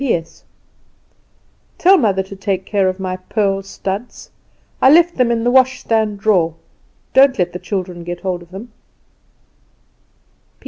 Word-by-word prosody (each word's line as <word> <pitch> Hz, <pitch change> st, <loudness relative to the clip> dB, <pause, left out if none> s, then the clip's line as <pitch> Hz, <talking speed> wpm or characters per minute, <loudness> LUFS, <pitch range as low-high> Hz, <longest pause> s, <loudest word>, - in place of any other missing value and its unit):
"P.S. 175 Hz, -12 st, -3 dB, 1.3 s
Tell 375 Hz, +3 st, +5 dB
mother 200 Hz, -, +1 dB
to 195 Hz, +1 st, -11 dB
take 190 Hz, -1 st, -3 dB
care 195 Hz, -3 st, +1 dB
of 185 Hz, +1 st, -5 dB
my 185 Hz, -1 st, -3 dB
pearl 195 Hz, +1 st, -1 dB
studs. 195 Hz, +3 st, -6 dB, 0.5 s
I 265 Hz, -, +6 dB
left 340 Hz, +2 st, +4 dB
them 250 Hz, -2 st, +2 dB
in 230 Hz, -1 st, 0 dB
the 245 Hz, -, +2 dB
wash 260 Hz, 0 st, +4 dB
hand -, -, -13 dB
stand 220 Hz, -3 st, 0 dB
drawer. 180 Hz, -7 st, +2 dB, 0.6 s
Don't 270 Hz, 0 st, +5 dB
let 175 Hz, -1 st, -1 dB
the 180 Hz, -, -5 dB
children 180 Hz, -4 st, -5 dB
get 175 Hz, 0 st, -6 dB
hold 185 Hz, -2 st, -3 dB
of 170 Hz, -, -16 dB
them. 200 Hz, +6 st, -10 dB
195 Hz, 150 wpm, -17 LUFS, 185-235 Hz, 1.3 s, I